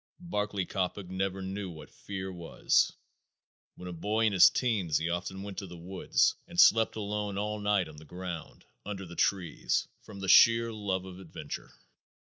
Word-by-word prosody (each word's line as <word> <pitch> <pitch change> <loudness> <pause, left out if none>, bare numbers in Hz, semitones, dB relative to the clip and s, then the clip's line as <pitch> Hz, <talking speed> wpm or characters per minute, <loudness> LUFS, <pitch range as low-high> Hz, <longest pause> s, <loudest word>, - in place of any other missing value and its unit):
Barclay 105 - -2
Coppock 95 0 -3
never 95 +1 -2
knew 95 0 -4
what 80 -4 -11
fear 95 -1 -6
was. 85 -2 +1 0.8
When 90 - -9
a 90 - -5
boy 105 +6 0
in 105 - +2
his 95 - +8
teens 105 - 0
he 85 +2 -1
often 95 +2 -4
went 100 -1 -6
to 100 - -7
the 90 0 -10
woods 90 +3 +1
and - - -5
slept 115 0 +6
alone 105 -1 -3
all 105 +1 -2
night 105 -4 +1
on 75 -1 -12
the 75 - -11
ground, 90 -1 -7 0.2
under 95 -1 -5
the 85 0 -10
trees, 90 -3 0
from 100 -2 -11
the 95 - -4
sheer 115 +4 +6
love 95 -3 -2
of 95 -1 -9
adventure. 90 -4 -8
95 Hz, 175 wpm, -30 LUFS, 90-105 Hz, 0.8 s, his